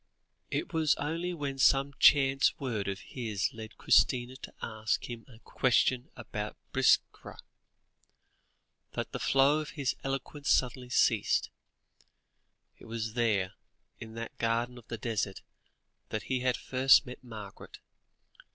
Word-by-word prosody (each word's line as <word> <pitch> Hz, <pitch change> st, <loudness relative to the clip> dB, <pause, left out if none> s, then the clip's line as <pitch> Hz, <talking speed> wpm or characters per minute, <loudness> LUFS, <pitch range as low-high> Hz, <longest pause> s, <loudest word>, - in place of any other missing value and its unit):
It 200 Hz, -, -3 dB
was 160 Hz, -2 st, +3 dB
only 165 Hz, +5 st, -3 dB
when 140 Hz, -5 st, -4 dB
some 135 Hz, +2 st, +4 dB
chance 135 Hz, -1 st, +5 dB
word 115 Hz, -8 st, -3 dB
of 100 Hz, 0 st, -3 dB
his 110 Hz, -6 st, -3 dB
led 110 Hz, -1 st, -10 dB
Christina 125 Hz, 0 st, +3 dB
to -, -, -10 dB
ask 110 Hz, -1 st, -2 dB
him 120 Hz, -2 st, -8 dB
a 120 Hz, -4 st, -15 dB
question 125 Hz, +3 st, +1 dB
about 105 Hz, -3 st, -6 dB, 0.2 s
Biskra, -, -, +2 dB, 1.6 s
that -, -, -4 dB
the -, -, -4 dB
flow 135 Hz, +3 st, +3 dB
of 155 Hz, 0 st, -7 dB
his 140 Hz, -3 st, 0 dB
eloquence 135 Hz, +1 st, -4 dB
suddenly 125 Hz, 0 st, +1 dB
ceased. -, -, +2 dB, 1.3 s
It -, -, -14 dB
was 115 Hz, -1 st, -4 dB
there, 105 Hz, -6 st, +1 dB, 0.5 s
in 110 Hz, 0 st, -9 dB
that 115 Hz, 0 st, -6 dB
garden 120 Hz, +2 st, -1 dB
of 115 Hz, -, -19 dB
the 115 Hz, -, -5 dB
desert, 105 Hz, -4 st, -3 dB, 0.7 s
that 110 Hz, -, -3 dB
he 130 Hz, -1 st, -1 dB
had 125 Hz, 0 st, +1 dB
first 135 Hz, +2 st, +4 dB
met 125 Hz, 0 st, -10 dB
Margaret. 110 Hz, -5 st, -10 dB
125 Hz, 135 wpm, -30 LUFS, 110-135 Hz, 1.6 s, chance